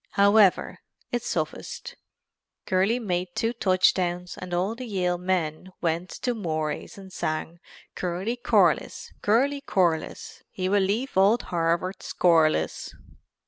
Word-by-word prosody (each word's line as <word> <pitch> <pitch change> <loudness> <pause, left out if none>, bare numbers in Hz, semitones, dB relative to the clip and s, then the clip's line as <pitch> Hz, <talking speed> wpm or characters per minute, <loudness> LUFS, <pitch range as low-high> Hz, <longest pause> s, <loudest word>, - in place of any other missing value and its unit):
However, 200 -1 +4 0.3
it 240 - -1
sufficed. 485 - -4 0.7
Curly 190 +5 +2
made 180 -6 -3
two 230 0 0
touchdowns 180 -3 +1
and 180 -1 -8
all 180 +5 0
the 250 +1 -7
Yale 180 -4 -1
men 180 -1 -2
went 170 +1 -1
to 245 - +1
Mory's 160 -2 -3
and 190 -1 -12
sang 155 +2 -3 0.3
"Curly 185 +6 -2
Corliss, 245 0 +1
Curly 275 +7 +2
Corliss, 175 - -1
he 185 -4 -3
will 200 +1 +3
leave 215 +8 -1
old 200 +5 +4
Harvard 170 +3 0
scoreless." 160 - +1
185 Hz, 120 wpm, -26 LUFS, 175-220 Hz, 0.7 s, However